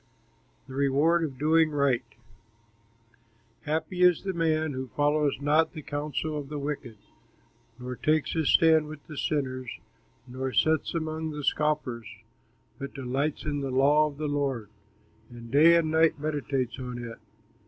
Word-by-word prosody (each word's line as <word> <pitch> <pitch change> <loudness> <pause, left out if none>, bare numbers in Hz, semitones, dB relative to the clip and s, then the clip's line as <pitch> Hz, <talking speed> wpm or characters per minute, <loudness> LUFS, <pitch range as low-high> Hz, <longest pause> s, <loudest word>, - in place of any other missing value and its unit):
THE 130 - -10
REWARD 140 +5 +2
OF 140 -5 -4
DOING 160 +3 +3
RIGHT 135 -6 0 1.5
Happy 160 +4 -2
is 180 -2 +5
the 190 -1 -2
man 160 -3 0
Who 130 0 -4
follows 145 0 +1
not 150 +3 +2
the 155 -3 -8
counsel 150 +1 -3
of 140 -2 -8
the 150 - -4
wicked, 140 -5 -5 0.8
Nor 125 0 -6
takes 155 -1 +1
his 160 -3 0
stand 160 -2 +5
with 155 -1 -9
sinners, 130 -4 -2 0.6
Nor 130 +1 -4
sits 160 +1 +2
among 160 0 -3
the 150 -1 -6
scoffers, 140 -6 -1 0.7
But 140 +1 -7
delights 135 +4 -2
in 145 -1 -2
the 135 - -3
law 145 +4 +4
of 145 -2 -9
the 150 0 -2
Lord, 135 -7 -2 0.6
And 120 -1 -11
day 160 +4 +7
and 160 -2 +2
night 160 0 +3
meditates 140 -4 -2
on 125 -1 -5
it. 115 -1 -7
145 Hz, 145 wpm, -27 LUFS, 130-155 Hz, 1.5 s, day